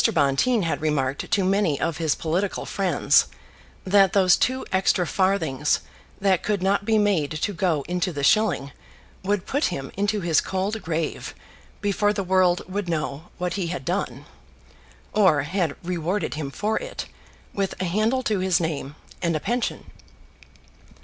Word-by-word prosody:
Bonteen 155 - +2
had 165 - -1
remarked 140 -3 -1
to 200 - +2
many 190 -6 +2
of 165 - -1
his 160 -3 +1
political 180 +5 -2
friends 195 -2 +2 0.6
that 195 -1 +4
those 185 -2 +5
two 260 +1 0
extra 190 -1 +2
farthings 160 -7 +1 0.4
that 190 -3 +2
could 205 -3 -1
not 200 +1 +1
be 220 0 +3
made 200 -9 +2
to 160 +6 -2
go 165 -5 0
into 180 +2 -1
the 145 -3 -4
shilling 175 -7 +2 0.5
would 195 0 -1
put 285 +3 0
him 135 -7 -3
into 205 +2 0
his 170 -3 +3
cold 195 +3 -2
grave 165 -1 -3 0.5
before 205 0 +1
the 200 -1 -2
world 185 -1 +3
would 190 -1 -3
know 155 -1 -2
what 180 -1 -2
he 185 -3 -2
had 165 -6 -5
done, 180 +5 -2 0.9
or 185 -9 +4
had 165 -1 -1
rewarded 180 +3 -2
him 150 -2 -4
for 210 +10 -1
it - - -6 0.5
with 195 -1 -2
a 185 - -1
handle 215 +8 +1
to 215 -4 0
his 185 -1 +2
name, 150 -4 -3 0.3
and 170 -2 0
a - - 0
pension. 240 +8 -2
185 Hz, 155 wpm, -24 LUFS, 160-200 Hz, 0.9 s, those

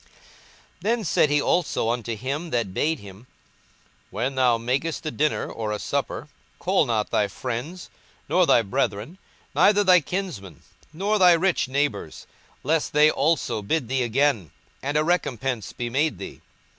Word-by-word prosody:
42:014:012 - - -28 0.7
Then 230 +1 0
said 165 -3 +2
he 145 0 +3
also 125 -8 0
to 115 +1 -4
him 140 +9 -4
that 115 -9 -1
bade 160 +10 0
him, 100 +4 -13 0.8
When 125 +4 -2
thou 125 -3 +3
makest 135 +9 -2
a 155 - -2
dinner 150 +1 0
or 110 -2 -4
a 105 - -1
supper, 140 +5 -3 0.3
call 185 -4 +1
not 110 -3 -1
thy 105 - +2
friends, 130 - -6 0.4
nor 180 -1 +3
thy 115 - +5
brethren, 105 - -2 0.3
neither 205 0 +4
thy 185 -2 +6
kinsmen, 145 - -5 0.3
nor 200 +6 0
thy 180 -2 +7
rich 170 -3 +1
neighbours; 130 - -2 0.4
lest 155 +3 0
they 150 +1 +6
also 140 -7 0
bid 120 +4 -1
thee 130 0 0
again, 120 - +1 0.3
and 145 +2 -1
a 150 - +3
recompence 135 - -1
be 120 - -4
made 145 +6 0
thee. - - -9
140 Hz, 155 wpm, -24 LUFS, 115-165 Hz, 0.8 s, thy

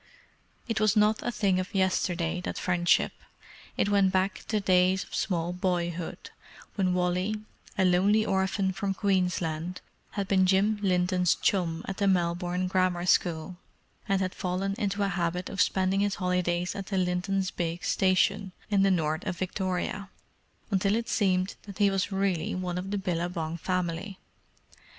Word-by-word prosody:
It 225 -2 -1
was 215 0 +3
not 210 0 +3
a 240 - -2
thing 200 -5 +1
of 185 +2 -5
yesterday, 180 -2 0
that - - -4
friendship. 175 -1 +2 0.7
It - - +2
went 200 -2 +3
back 190 +1 0
to 215 - +1
days 185 -1 +3
of - - -16
small 175 -3 -1
boyhood, 175 -2 -3 0.4
when 185 -3 +1
Wally, 180 +3 0 0.4
a 190 - +3
lonely 200 +4 +3
orphan 190 0 +1
from 195 +1 -2
Queensland, 180 -3 -1 0.3
had 200 -2 -2
been 190 -1 +3
Jim 200 +3 +3
Linton's 180 -2 +2
chum 170 -4 0
at 195 - -4
the 200 - +1
Melbourne 175 0 +1
Grammar 185 -1 +1
School, 175 0 +1 0.5
and 195 -1 +2
had 185 -1 -1
fallen 185 +2 -2
into 205 -2 0
a - - +2
habit 180 -1 -2
of 195 - -1
spending 190 -1 +2
his 205 0 +1
holidays 180 -1 0
at 195 -1 -6
the 195 - -2
Linton's 185 +1 0
big 170 0 -3
station 185 0 +2 0.2
in 200 -1 +4
the 195 - +4
north 160 -2 0
of 180 - -2
Victoria, 185 +1 -2 0.6
until 195 +1 +2
it 230 +1 -2
seemed 185 -2 +1
that 200 - -9
he 200 -1 +4
was 195 +1 -1
really 195 -3 0
one 180 -1 -3
of 190 +2 -6
the 205 - -1
Billabong 170 -3 -2
family. 180 +2 -2
185 Hz, 160 wpm, -28 LUFS, 180-195 Hz, 0.7 s, in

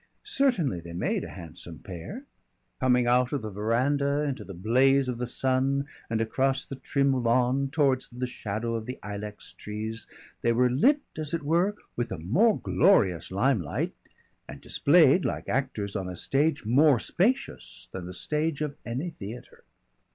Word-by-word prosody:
Certainly 250 - +1
they 85 0 -9
made 85 - -1
a - - -7
handsome 85 0 -9
pair. 95 - -8 0.6
Coming 125 -2 +3
out 125 +1 +3
of 140 -5 -1
the 110 - -4
veranda 140 +8 +1
into 140 -2 -3
the 95 - -9
blaze 130 +8 +3
of 125 -2 -3
the 125 - -2
sun 135 +2 +1 0.2
and 115 -1 0
across 130 +4 +1
the 135 - -7
trim 140 -1 +1
lawn 125 +3 +2
towards 135 -4 +2
the 125 +1 -4
shadow 115 -1 -3
of 115 -1 -3
the 125 - -5
ilex 105 0 -6
trees, 110 +2 -5 0.3
they 115 - +2
were 125 +1 +3
lit, 275 - +4 0.2
as 155 +1 -1
it 165 - -4
were, 175 +7 +2 0.2
with 120 - -2
a 95 - -3
more 175 - +3
glorious 95 - +3
limelight, 100 - 0 0.6
and - - -8
displayed 160 +2 +4
like - - -3
actors 115 -7 -2
on 95 -2 -2
a 90 - -6
stage 145 - 0
more 135 +4 +5
spacious 230 - -1
than 90 -2 -6
the 90 - -7
stage 150 - -1
of 145 -2 -3
any 130 +9 -3
theatre. 115 -4 -10
125 Hz, 165 wpm, -27 LUFS, 110-145 Hz, 0.6 s, more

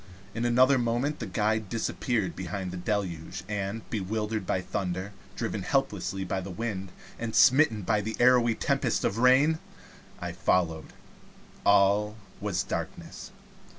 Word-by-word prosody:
In 115 +2 -2
another 130 +3 +5
moment 120 +5 0
the 115 - -4
guide 110 +2 0
disappeared 115 -4 -1
behind 95 0 -4
the - - -6
deluge, 90 -4 -3
and 105 +1 -4
bewildered 105 -1 -2
by 95 - +1
the - - -15
thunder, 95 +2 -3 0.2
driven - - -3
helplessly 95 0 -1
by 95 +1 -2
the 95 - -7
wind, 95 -1 -4 0.3
and 115 -1 -3
smitten 130 -6 +5
by 105 +2 +1
the 110 +2 -4
arrowy 120 -2 +5
tempest - - 0
of 105 - 0
rain, 135 +6 +5 0.6
I - - -4
followed. 80 -4 0 0.8
All 100 +2 +4 0.2
was 100 -4 -1
darkness. - - -6
105 Hz, 140 wpm, -28 LUFS, 95-115 Hz, 0.8 s, another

